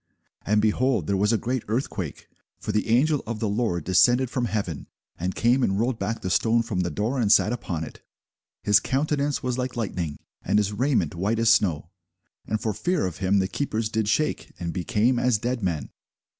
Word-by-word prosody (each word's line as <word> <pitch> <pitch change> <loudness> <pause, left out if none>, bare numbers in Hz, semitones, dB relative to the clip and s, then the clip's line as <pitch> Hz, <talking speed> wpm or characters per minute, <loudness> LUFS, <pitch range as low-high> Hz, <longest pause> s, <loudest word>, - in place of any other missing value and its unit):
And, 105 0 +3
behold, 115 - +1
there 100 - 0
was 105 +3 +2
a 115 - +3
great 125 +3 -2
earthquake: 105 - -3 0.3
for - - -3
the 105 - 0
angel 145 +5 +3
of 115 -1 -4
the 110 - -1
Lord 100 -5 -1
descended 120 +8 +3
from 125 -2 0
heaven, 100 -8 -3 0.3
and 90 +2 -2
came 120 +3 +3
and 95 -4 +1
rolled 120 +1 0
back 110 +4 -3
the 95 - -2
stone 115 +4 +3
from 110 -5 -3
the 90 -1 0
door, 110 - -2
and 105 -4 +2
sat 110 - +5
upon 90 -8 -4
it. - - -10 0.6
His 105 0 +5
countenance 145 +2 -1
was 125 0 -1
like 125 0 -3
lightning, 90 -9 -3 0.2
and - - +1
his 105 0 +1
raiment 130 -1 +1
white 100 +6 -1
as 115 0 +4
snow: 85 -6 +1 0.6
and 110 - -1
for 110 -1 -1
fear 175 - 0
of 90 -3 -4
him 95 +1 +1
the 95 -1 +2
keepers 110 -2 -2
did 110 -1 -1
shake, 155 +8 0
and 85 -1 -3
became 110 +7 +1
as 125 -3 +2
dead 120 +2 -2
men. 85 -8 -2
110 Hz, 200 wpm, -25 LUFS, 95-125 Hz, 0.6 s, sat